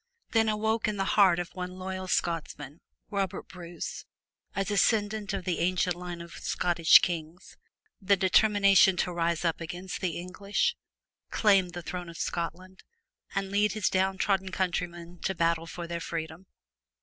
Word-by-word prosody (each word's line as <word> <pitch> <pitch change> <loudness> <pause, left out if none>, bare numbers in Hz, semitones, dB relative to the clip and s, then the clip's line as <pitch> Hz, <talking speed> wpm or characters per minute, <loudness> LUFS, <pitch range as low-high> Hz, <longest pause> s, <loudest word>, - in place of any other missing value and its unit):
Then 225 -1 +3
awoke 220 +1 0
in 210 -1 -2
the 195 - +1
heart 190 -4 +5
of 175 -1 -4
one 180 0 -6
loyal 185 0 -5
Scotsman, 160 -4 -2 0.3
Robert 195 -2 -2
Bruce, 175 -1 -7 0.5
a 195 - 0
descendant 210 0 +1
of 195 -3 -4
the 180 -2 -1
ancient 180 0 +1
line 175 -1 -7
of 170 0 -10
Scottish 170 -2 +4
kings, 165 0 -4 0.5
the 200 +1 +3
determination 195 -1 +5
to 180 0 0
rise 170 0 0
up 165 0 0
against 175 +2 -6
the 180 -4 -1
English, 185 +3 -1 0.5
claim 195 -4 +3
the 175 0 -7
throne 175 +1 -5
of 165 - -10
Scotland, 185 +2 -4 0.5
and 195 0 -2
lead 210 +1 +2
his 215 -3 +1
down 190 0 +1
trodden 190 -1 0
countrymen 175 -2 -3
to 190 - -2
battle 165 -1 +1
for 175 0 -6
their 170 0 -4
freedom. 165 +2 -5
180 Hz, 155 wpm, -28 LUFS, 170-195 Hz, 0.5 s, heart